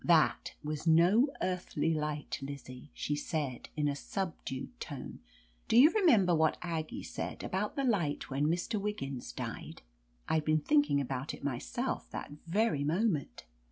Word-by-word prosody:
"That 165 -3 +3
was 150 +2 -3
no 175 - +6 0.2
earthly 180 -3 0
light, 150 -1 -2
Lizzie! 135 -1 -8
she 145 - -2
said 145 -4 -3
in 150 -1 +2
a 140 - 0
subdued 170 - -4
tone. 145 -5 -6 0.5
"Do 225 - +4
you 290 +6 +9
remember 235 - +5
what 160 -1 +3
Aggie 160 -3 -3
said, - - -5
about 200 +3 -2
the 275 - 0
light 190 - +1
when 140 +2 0
Mr. 180 +6 0
Wiggins 140 - -4
diedr* - - -6 0.5
I*d 160 -1 +2
been 155 0 +2
thinking 290 - +3
about 135 +1 -3
it - - -15
myself 120 - -2
that - - -6 0.2
very 175 -5 +2
moment. 165 0 0
160 Hz, 150 wpm, -32 LUFS, 145-195 Hz, 0.5 s, you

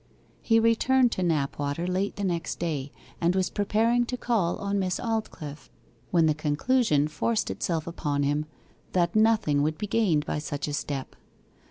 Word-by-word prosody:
He 225 -1 +3
returned 240 +2 +3
to 185 - -2
Knapwater 145 -1 -1
late 190 +2 -1
the 205 - -4
next 175 -3 -2
day, 145 -5 -3 0.3
and 175 +2 +2
was 190 -1 0
preparing 225 +4 +2
to 250 - -3
call 220 -9 0
on 200 0 -1
Miss 185 -2 -1
Aldclyffe, 200 -10 -4 0.4
when 170 -2 +3
the 155 - +3
conclusion 150 - +1
forced 210 +9 -1
itself 165 -4 -2
upon 145 -4 -2
him 145 +2 0 0.5
that 175 0 +1
nothing 215 -10 +3
would 155 +1 0
be 210 - -3
gained 190 -9 +1
by 150 - -2
such 145 -1 -4
a 145 - -3
step. 140 -2 -4
175 Hz, 165 wpm, -27 LUFS, 150-215 Hz, 0.5 s, He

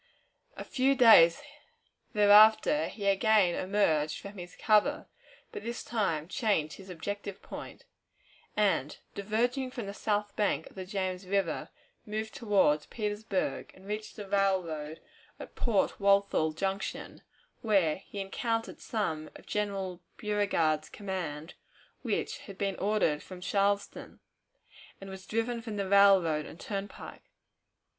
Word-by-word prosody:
A - - -5
few 270 +1 +1
days 220 -10 +7 0.7
thereafter 215 +7 +6
he 205 - -7
again 200 -2 +4
emerged 165 -7 +1
from 200 -1 -10
his 175 0 -9
cover, 215 -2 +2 0.5
but - - -6
this 235 +2 -5
time 165 -9 -1
changed 190 - 0
his 195 -1 -13
objective 200 +3 -5
point, - - -9 0.7
and, 195 -9 +1 0.2
diverging 240 +6 -1
from 245 -3 -6
the 200 - -6
south 205 0 -2
bank 205 -2 0
of - - -21
the 190 -1 -6
James 185 -2 -3
River, 180 -5 -1 0.3
moved 220 +1 -4
toward 195 -9 +2
Petersburg, 210 -3 -3
and 190 - -17
reached 210 +1 -5
the 205 -2 -8
railroad 180 -6 0 0.4
at - - -9
Port 220 -5 0
Walthal 200 -5 +3
Junction, 195 +4 -4 0.4
where 195 -8 +2
he 195 +1 -9
encountered 225 +3 -3
some 160 -9 -2
of - - -13
General 195 -4 -3 0.2
Beauregard's 185 -8 0
command, 175 -6 -5 0.5
which - - -2
had 195 -2 -9
been 195 -1 -1
ordered 200 -7 +1
from 185 -1 -10
Charleston, 200 +2 -1 0.8
and 195 0 -9
was 190 0 -10
driven 230 +1 -1
from 220 -3 -6
the 200 -1 -2
railroad 190 -6 +5
and - - -12
turnpike. 200 -1 -7
200 Hz, 130 wpm, -30 LUFS, 180-210 Hz, 0.8 s, days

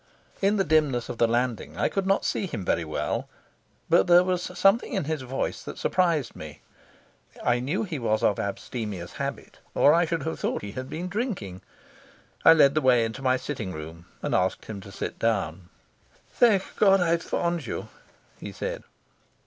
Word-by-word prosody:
In 200 +1 +3
the 195 - +3
dimness 150 -7 +1
of 115 - -6
the 115 - +5
landing 120 0 -1
I - - +2
could 195 -1 -2
not 195 +1 +2
see 195 - -1
him 105 - -5
very 85 - +1
well, 75 -1 -3 0.6
but 95 - +4
there 175 +1 +7
was 180 -1 0 0.2
something 195 +6 +3
in 195 - 0
his 155 0 -2
voice 130 +1 -3
that - - -8
surprised 165 -9 +1
me. 75 -2 -10 0.8
I 120 0 +2
knew 150 - -1
he 170 -8 -4
was 110 -1 0
of 105 -3 +2
abstemious 100 -3 -4
habit - - -5 0.2
or 145 - +6
I 170 +1 +4
should 165 0 -2
have 160 - -4
thought - - -2
he 100 - -5
had 130 +3 -6
been 175 +3 -4
drinking. 180 - -4 0.8
I 165 - +9
led 140 -4 +5
the 155 - +1
way 125 -3 +4
into 115 +4 -6
my 130 -1 +2
sitting 115 -9 -5
room 80 +2 -9 0.2
and - - -1
asked 95 0 0
him 105 -3 -7
to 100 - -11
sit - - -5
down. 95 -6 -1 0.6
"Thank 210 -6 +2
God 195 -2 +5
I've 170 -1 +2
found 170 -6 -2
you," - - -5 0.5
he - - -7
said. - - -4
130 Hz, 185 wpm, -26 LUFS, 110-175 Hz, 0.8 s, I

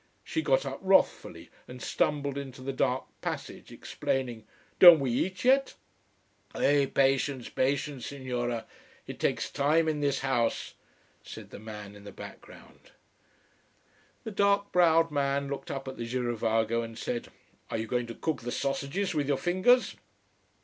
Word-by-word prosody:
She 320 - -2
got - - +2
up - - -5
wrathfully 190 0 +1 0.2
and 125 0 -10
stumbled 140 +1 -1
into 135 -2 -7
the 135 +1 -3
dark 130 0 0 0.2
passage, - - -6
exclaiming 120 -5 -3 0.3
"Don't 175 -3 +11
we 135 -3 -1
eat 185 - -2
yet?" 270 +1 +3 0.8
"Eh 140 -1 +3
Patience! 135 -1 +1
Patience, 135 0 -1
Signora. 120 -4 -3 0.4
It - - -8
takes - - -1
time 155 +3 +2
in 155 -1 0
this 140 -2 0
house," 120 -4 0 0.5
said - - -10
the - - -9
man 105 -2 -9
in 100 - -13
the 100 - -9
background. - - -13 1.3
The 220 - -5
dark 200 0 +2
browed 165 -2 +4
man 140 -1 0
looked 140 - -5
up 135 -1 -5
at 130 - -6
the 115 - -4
girovago 115 -2 0
and 115 -1 -7
said: 120 0 -3 0.4
"Are - - -2
you 110 - -2
going 120 +1 -1
to 115 - -7
cook 155 -6 -2
the 120 +1 -5
sausages 140 +9 -2
with 145 -3 -1
your 140 -1 +1
fingers?" 185 - +2
135 Hz, 150 wpm, -29 LUFS, 120-155 Hz, 1.3 s, Don't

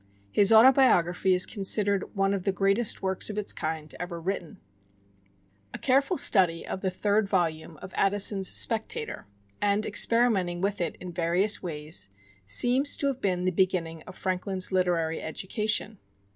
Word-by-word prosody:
His 205 - +4
"Autobiography" 220 -7 +4
is 180 - +4
considered 200 0 -1
one 195 0 0
of 195 -2 -3
the 195 - 0
greatest 195 +4 +1
works 190 +1 0
of 210 - -6
its 210 - +2
kind 155 -1 -5
ever 175 -1 -6
written. 175 -1 -5 1.2
A - - -5
careful 275 +6 +1
study 180 -11 +3
of 190 - -6
the 190 - -1
third 205 +2 -1
volume 165 -4 -2
of 190 - -10
Addison's 195 -1 +2
"Spectator," 220 - -1 0.3
and 205 +1 0
experimenting 205 -7 +1
with 200 +1 -2
it 170 - -3
in 180 -1 -10
various 180 +5 0
ways, 150 - -3 0.4
seems 245 - +3
to - - -3
have 270 -2 -2
been 180 -2 -1
the 185 - +1
beginning 170 -3 -1
of 185 - -11
Franklin's 185 0 -1
literary 175 -3 -1
education. 210 +4 -3
190 Hz, 150 wpm, -26 LUFS, 175-210 Hz, 1.2 s, His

